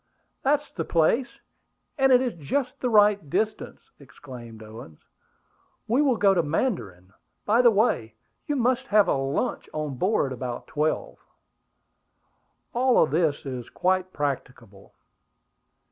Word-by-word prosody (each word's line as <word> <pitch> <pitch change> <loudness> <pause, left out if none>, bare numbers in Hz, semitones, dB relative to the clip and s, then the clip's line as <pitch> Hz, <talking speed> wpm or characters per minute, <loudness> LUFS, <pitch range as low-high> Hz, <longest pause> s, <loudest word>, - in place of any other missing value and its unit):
"That's 295 +2 0
the 165 - -4
place; 170 +12 +1 0.7
and 270 -1 +3
it 250 0 +6
is 250 - -2
just 255 - -3
the 250 - -1
right 205 -6 +4
distance!" 215 +7 -3
exclaimed 120 -4 -12
Owen. 110 -8 -11 0.9
"We 245 +6 +2
will 265 -5 +2
go 200 -2 +4
to 175 - +2
Mandarin. 115 - -3 0.3
By 225 +4 +4
the 240 - +6
way, 200 - +1 0.3
you 295 - 0
must 250 -1 0
have 210 -1 +4
a - - +2
lunch 135 - -2
on 150 -4 -4
board 185 -9 +1
about 125 -1 -5
twelve." 155 +1 -2 1.5
"All 250 -5 +4
this 155 -1 0
is 125 -3 -6
quite 185 0 0
practicable." 125 - -5
170 Hz, 130 wpm, -25 LUFS, -, 1.5 s, it